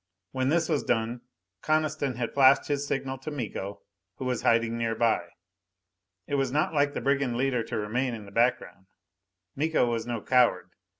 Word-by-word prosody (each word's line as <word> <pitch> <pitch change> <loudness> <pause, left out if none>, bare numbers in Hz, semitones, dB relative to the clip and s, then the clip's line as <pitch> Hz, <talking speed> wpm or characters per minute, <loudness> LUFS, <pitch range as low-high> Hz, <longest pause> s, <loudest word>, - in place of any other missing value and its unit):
When 130 0 0
this 165 +1 +2
was 155 -4 0
done, 115 +1 -1 0.4
Coniston 155 -4 0
had 120 -1 -3
flashed 135 +1 +5
his 145 0 -1
signal 135 -1 -3
to 135 - -6
Miko, 105 -8 -5 0.3
who 130 - -6
was 125 -1 -1
hiding 115 0 +2
nearby. 115 0 0 1.0
It - - -7
was 135 -2 -1
not 150 +3 0
like 145 -1 +2
the - - -2
brigand 135 -3 +1
leader 130 -2 +1
to - - -4
remain 120 +4 -1
in 105 -2 -9
the 100 - -13
background. 115 -5 0 0.7
Miko 155 -1 +2
was 115 -1 -2
no 120 -1 -2
coward. 105 -7 +2
125 Hz, 170 wpm, -27 LUFS, 115-140 Hz, 1.0 s, flashed